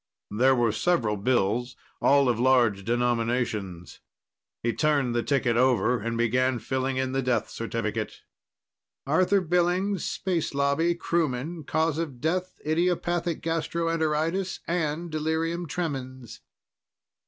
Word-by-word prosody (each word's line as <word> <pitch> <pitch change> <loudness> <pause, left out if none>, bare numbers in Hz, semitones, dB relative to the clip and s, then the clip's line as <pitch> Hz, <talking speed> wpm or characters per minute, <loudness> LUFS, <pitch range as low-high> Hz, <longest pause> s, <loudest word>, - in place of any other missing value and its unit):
There 130 +5 +4
were 120 -2 +2
several 115 -4 +1
bills, 120 +2 0 0.3
all 140 -1 +4
of 120 -2 +1
large 120 -6 +3
denominations. 115 -6 -1 0.6
He 115 0 +1
turned 145 -5 +1
the 120 - +1
ticket 125 -3 +1
over 125 -1 +3
and 115 +2 -3
began 125 +2 +2
filling 130 +2 -2
in 130 0 -1
the 135 0 0
death 125 -1 0
certificate. - - -4 0.8
"Arthur 185 +7 +3
Billings. 180 +2 +1
Space 170 -6 -2
Lobby. 140 +5 +2
Crewman. 160 -2 -2
Cause 160 +1 0
of 145 -7 -4
death, 180 +5 -2
idiopathic 170 +1 0
gastroenteritis 165 +2 -1
and 165 0 -2
delirium 160 +2 -1
tremens." 130 - -5
140 Hz, 115 wpm, -26 LUFS, 120-165 Hz, 0.8 s, There